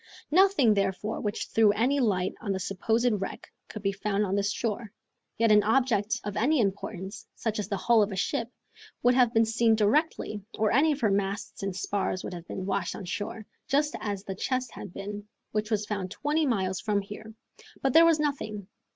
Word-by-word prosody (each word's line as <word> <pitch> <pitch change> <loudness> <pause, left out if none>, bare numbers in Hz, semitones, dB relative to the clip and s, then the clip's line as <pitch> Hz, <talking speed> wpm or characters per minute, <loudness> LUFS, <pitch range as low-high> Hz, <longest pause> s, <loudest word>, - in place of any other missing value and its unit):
Nothing 365 - +5
therefore 200 +2 -1
which 210 0 -2
threw 220 -2 +4
any 255 +7 +2
light 190 -7 +1
on 205 - -2
the 190 - -2
supposed 225 +6 +1
wreck 195 - -6 0.2
could 215 - -8
be 195 - +2
found 200 +1 -1
on 190 - -2
this 200 +1 +1
shore, 220 0 -3 0.5
yet 230 -1 +3
an 210 0 +7
object 220 -2 +1
of 205 -1 -4
any 285 +6 +2
importance, 195 -1 -3
such 220 -2 -2
as 210 - -2
the 200 - -1
hull 225 +4 +4
of 205 0 +1
a - - -4
ship, 225 +4 -1 0.5
would 245 +1 +5
have 250 -2 +4
been 225 -1 +4
seen 225 0 +3
directly, 215 -1 +1 0.2
or 215 -1 +2
any 295 +6 +4
of 290 -1 -3
her 215 -3 +3
masts 195 0 -2
and 195 -2 -3
spars 190 0 -2
would - - -5
have 175 -1 -8
been 185 - -5
washed 190 -2 -1
on 190 - -7
shore, 205 +3 -4 0.2
just 295 +2 +1
as 200 -2 -4
the 195 - -5
chest 255 +5 -2
had 200 - -9
been, 205 +2 -7 0.2
which 215 0 -1
was 210 -2 0
found 200 -3 -3
twenty 300 +7 0
miles 190 -6 0
from 210 -2 0
here. 215 +2 -10 0.5
But 270 -2 +2
there 330 - +8
was 325 -2 +4
nothing. 215 -9 -3
210 Hz, 205 wpm, -28 LUFS, 200-235 Hz, 0.5 s, there